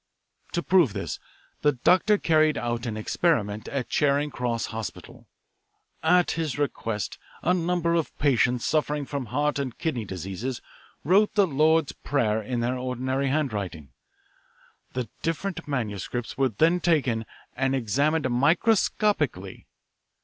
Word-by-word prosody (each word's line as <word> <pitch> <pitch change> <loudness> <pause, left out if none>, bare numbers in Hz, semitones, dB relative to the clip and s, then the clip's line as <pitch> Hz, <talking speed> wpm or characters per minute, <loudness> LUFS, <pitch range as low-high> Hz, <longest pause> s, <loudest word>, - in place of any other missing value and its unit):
"To 170 - -1
prove 175 - +4
this, - - -4 0.4
the 145 0 +3
doctor 185 - +3
carried 155 -4 +3
out 120 0 -2
an 110 -2 -3
experiment 110 - 0
at 135 -4 -3
Charing 145 +2 +1
Cross 120 -2 -2
Hospital. 110 -1 -7 0.7
At 180 +2 +4
his 160 -4 -2
request 115 -7 -2 0.2
a 180 - +3
number 175 -1 0
of 165 -2 -1
patients 125 -3 +2
suffering 150 -2 0
from 135 -3 -4
heart 145 +5 0
and 130 -3 -4
kidney 130 -9 -2
diseases 95 +7 -5 0.4
wrote 195 +7 +3
the 205 -2 +5
Lord's 155 -1 +2
Prayer 110 -6 0
in 120 +3 -3
their 125 +2 -1
ordinary 130 +2 -1
handwriting. 100 - -2 1.0
The 125 -2 -2
different 165 +3 -3
manuscripts 120 -3 -3
were 135 -1 +2
then 165 - +2
taken 130 -11 +1 0.3
and 135 +1 +1
examined 140 +5 +1
microscopically. 150 - +1
135 Hz, 130 wpm, -26 LUFS, 120-160 Hz, 1.0 s, the